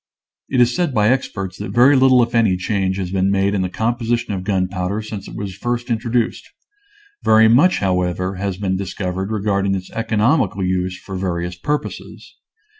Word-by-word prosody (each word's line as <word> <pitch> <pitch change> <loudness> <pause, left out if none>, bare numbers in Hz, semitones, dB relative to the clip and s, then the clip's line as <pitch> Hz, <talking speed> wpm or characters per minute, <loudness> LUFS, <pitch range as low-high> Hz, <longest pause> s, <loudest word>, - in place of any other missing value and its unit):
It 130 - +1
is 120 0 +4
said 175 -7 -1
by 105 0 +3
experts 100 -7 -2
that 105 - -5
very 130 +4 +6
little 130 -2 +5
if 115 -1 -4
any 110 -6 +3
change 95 0 -1
has 90 -2 -4
been 95 0 +1
made 100 0 +1
in 100 - 0
the 95 - -1
composition 115 +1 -1
of 95 -2 -4
gunpowder 95 +1 -1
since 105 -2 -7
it - - -10
was 100 -2 -5
first 120 +3 -3
introduced. 115 +1 -1 0.7
Very 110 0 +5
much, 140 +11 +4
however, 90 0 -1
has 95 -1 -3
been 95 -2 -1
discovered 95 0 -4
regarding 100 -2 0
its 95 -1 -6
economical 115 0 +1
use 90 0 -1
for 95 - -9
various 90 -1 -3
purposes. 145 +12 -5
100 Hz, 175 wpm, -19 LUFS, 95-115 Hz, 0.7 s, very